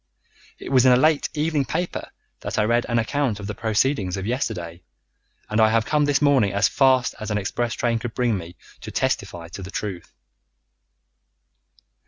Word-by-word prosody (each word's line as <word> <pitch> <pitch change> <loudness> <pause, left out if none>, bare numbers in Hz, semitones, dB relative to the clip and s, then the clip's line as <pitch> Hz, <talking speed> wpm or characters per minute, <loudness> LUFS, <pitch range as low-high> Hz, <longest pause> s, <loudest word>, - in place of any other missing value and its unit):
It - - -8
was 130 -2 +5
in - - +7
a - - +7
late 155 +2 +3
evening 150 -1 +1
paper 170 +7 -3 0.3
that - - -5
I 105 - +3
read 120 +2 +1
an 120 - +1
account 115 -1 0
of 100 - -7
the 105 - -4
proceedings 110 -3 0
of 95 - -4
yesterday, 95 -8 -3 0.7
and 110 +1 +1
I 110 - +6
have 110 0 +2
come 150 -1 +2
this 145 0 +1
morning 130 -9 +3
as 100 0 +3
fast 130 -2 +3
as 110 - -5
an 105 - 0
express 120 +4 -2
train 115 -1 0
could 115 0 -6
bring 120 -3 +1
me 85 -2 -7 0.2
to - - -8
testify 85 -1 -2
to 95 - -8
the 95 - -7
truth." 95 -4 -5
115 Hz, 185 wpm, -23 LUFS, 100-135 Hz, 0.7 s, in